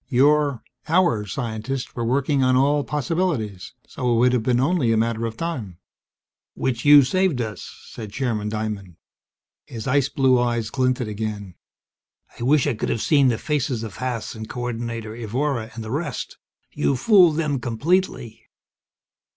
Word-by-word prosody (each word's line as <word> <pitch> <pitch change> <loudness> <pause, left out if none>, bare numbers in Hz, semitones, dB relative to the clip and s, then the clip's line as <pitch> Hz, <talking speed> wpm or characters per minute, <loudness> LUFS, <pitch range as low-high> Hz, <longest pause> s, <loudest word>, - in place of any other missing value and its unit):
Your 145 0 +3 0.2
our 165 - +2
scientists 120 +3 -4
were 120 - -2
working 135 +3 +1
on 130 0 +3
all 145 +2 +3
possibilities, 145 - -2
so 125 -2 -2
it 115 - +3
would 125 +2 +4
have 125 - +2
been 120 +1 +1
only 135 -3 +2
a 110 - +2
matter 115 0 0
of 110 0 -8
time." 125 - -4 0.8
"Which 120 -3 -2
you 145 0 +9
have 140 -3 +7
saved 185 -3 +1
us," 110 -3 -5
said 110 -3 -9
Chairman 110 -4 -2
Diamond. 105 -4 -4 0.7
His 115 -2 -7
ice 135 0 +2
blue 130 -3 +3
eyes 120 -2 -1
glinted 130 -2 0
again. 105 -3 -5 0.9
"I - - -9
wish 135 +3 +3
I 145 - +1
could 110 - -3
have 115 - -1
seen 140 +2 +3
the 120 -3 +1
faces 135 -5 -2
of 110 -4 -7
Haas 125 -3 -3
and 110 -1 -8
Co 125 - -5
ordinator 115 -2 -4
Evora, 120 +1 -2
and 115 - -6
the 110 - -7
rest. 145 -1 -4 0.3
You 140 - 0
fooled 175 - +5
them 150 -4 0
completely!" 120 -2 -1
125 Hz, 165 wpm, -23 LUFS, 110-140 Hz, 0.9 s, you